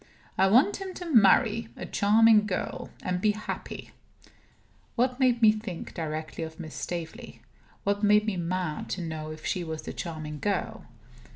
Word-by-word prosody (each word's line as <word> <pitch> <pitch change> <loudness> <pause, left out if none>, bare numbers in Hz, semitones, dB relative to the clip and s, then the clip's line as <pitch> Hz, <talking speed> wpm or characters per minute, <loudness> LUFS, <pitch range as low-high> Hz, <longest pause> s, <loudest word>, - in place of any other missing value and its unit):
I 190 - +4
want 255 - +4
him 385 -1 -7
to 355 - -6
marry 225 +1 +5
a - - -5
charming 215 +1 +4
girl, 185 - -3
and 180 0 -1
be 210 0 +3
happy." 215 +1 -6 1.0
What 250 +1 +1
made 245 -3 +3
me 215 - +9
think 215 -5 -6
directly 155 0 -4
of 160 +1 -8
Miss 160 -3 -7
Staveley? 170 -2 -6 0.4
What 200 0 0
made 210 0 +4
me 215 -3 -1
mad 175 -2 -3
to - - -4
know 160 -1 -5
if 155 0 -9
she 180 - -1
was 160 -1 -5
the - - -6
charming 155 -3 -6
girl? 205 +3 -2
195 Hz, 165 wpm, -27 LUFS, 160-220 Hz, 1.0 s, me